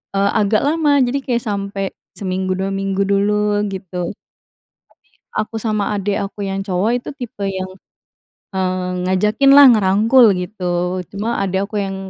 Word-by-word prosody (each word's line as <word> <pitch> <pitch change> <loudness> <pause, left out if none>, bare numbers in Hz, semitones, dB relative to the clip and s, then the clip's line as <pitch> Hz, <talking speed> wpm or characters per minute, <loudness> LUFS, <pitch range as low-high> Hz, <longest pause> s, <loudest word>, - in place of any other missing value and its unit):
eee, 200 0 +2
agak 215 0 +1
lama. 300 0 +2
Jadi 250 +3 0
kayak 240 -2 0
sampai 200 -2 -3 0.2
seminggu, 185 -1 -2
2 190 +1 -2
minggu 195 0 -1
dulu, 205 +1 +1
gitu. 185 -1 -5
Tapi, - - -71 1.0
aku 215 +1 -3
sama 215 -2 -1
adik 200 0 -1
aku 205 +1 -8
yang 195 0 -3
cowok 195 +3 0
itu - - -7
tipe 230 -7 -6
yang, 190 -1 -3 0.8
eee, 185 -1 -1 0.2
ngajakin 210 +9 +3
lah, 285 0 +10
ngerangkul, 220 +4 +4
gitu. 180 -1 -2
Cuma, 215 +4 -2
adik 195 +1 -1
aku 210 - -1
yang 195 -1 -3
200 Hz, 150 wpm, -18 LUFS, 190-215 Hz, 1.0 s, lah